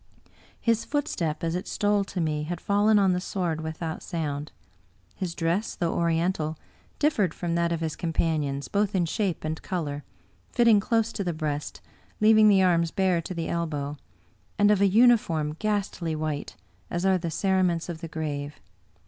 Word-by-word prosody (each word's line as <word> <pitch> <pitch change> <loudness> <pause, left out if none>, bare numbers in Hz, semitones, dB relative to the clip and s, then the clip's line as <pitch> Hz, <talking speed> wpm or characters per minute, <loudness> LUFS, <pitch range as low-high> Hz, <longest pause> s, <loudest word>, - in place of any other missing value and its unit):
His 230 -1 +1
footstep, 275 - -2
as 165 0 0
it 180 +4 -3
stole 205 -1 +1
to 190 - -5
me, 155 -2 0
had 175 +1 -4
fallen 205 +2 +3
on 195 -2 +4
the 180 - -1
sward 175 -5 -2
without 160 0 -4
sound. 150 -4 -4 0.6
His 175 -3 -4
dress, 170 +6 -1
though 170 -2 -1
Oriental, 165 -1 0 0.4
differed 215 - +1
from 170 -1 -2
that 170 0 +1
of 165 -1 -1
his 160 -1 -2
com 170 -2 -3
panions, 150 -4 -1
both 205 0 0
in 180 -2 +2
shape 185 0 -2
and 155 +1 -3
color 145 -6 -3 0.3
— 95 -1 -32
^fitting 230 -4 +5
close 225 +1 +1
to 200 - -2
the 175 -2 -1
breast, 150 -2 -4 0.4
leaving 215 0 +6
the 195 -2 +5
arms 170 -2 +3
bare 185 -1 +1
to 180 +3 -6
the 165 -1 -3
elbow, 150 -4 -2 0.6
and 205 0 +5
of 205 -2 +3
a 200 - +6
uniform 190 -9 +3
ghastly 200 -6 -1
white, 155 -2 -3 0.3
as 175 +2 -2
are 190 -1 +3
the 170 -1 -3
cerements 185 -2 +1
of 170 -2 -6
the 165 - -5
grave. 150 -2 -4
170 Hz, 175 wpm, -26 LUFS, 160-200 Hz, 0.6 s, leaving